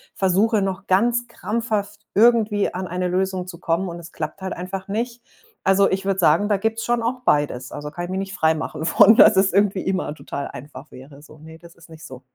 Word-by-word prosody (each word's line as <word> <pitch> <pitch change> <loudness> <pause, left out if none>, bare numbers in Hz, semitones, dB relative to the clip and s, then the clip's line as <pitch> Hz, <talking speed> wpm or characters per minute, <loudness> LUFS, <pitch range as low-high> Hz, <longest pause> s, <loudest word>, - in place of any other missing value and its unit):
versuche 200 +3 +2
noch 195 0 -3
ganz 240 +6 +2
krampfhaft 215 -3 -3
irgendwie 220 -2 +3
an 185 +1 -4
eine 180 +1 -2
Lösung 185 0 -2
zu 175 -2 -10
kommen, 175 +2 -1
und 170 - -7
es 165 -1 -12
klappt 155 +4 -6
halt 190 - -3
einfach 185 +2 -6
nicht. 235 +3 -3 0.4
Also, 195 +1 +4
ich 195 0 -2
würde 195 -1 0
sagen, 180 +5 +3
da 205 - +2
gibt's 225 +3 -2
schon 240 0 0
auch 250 +2 -2
beides. 145 -4 0
Also, 150 0 -6
kann 175 +2 -6
ich 180 - -7
mich 190 - -2
nicht 195 0 -5
frei 160 -2 +2
machen 155 0 -5
von, 205 +6 +6
dass 215 -4 +7
es 190 -1 +3
irgendwie 200 -1 +2
immer 185 -5 -2
total 140 -1 -6
einfach 145 +3 -11
wäre, 140 +2 -13
so. 155 -1 -16
Ne, 160 +1 -13
das 170 0 -16
ist 165 -1 -19
nicht 160 0 -12
so. 130 -2 -11
190 Hz, 225 wpm, -22 LUFS, 165-205 Hz, 0.4 s, dass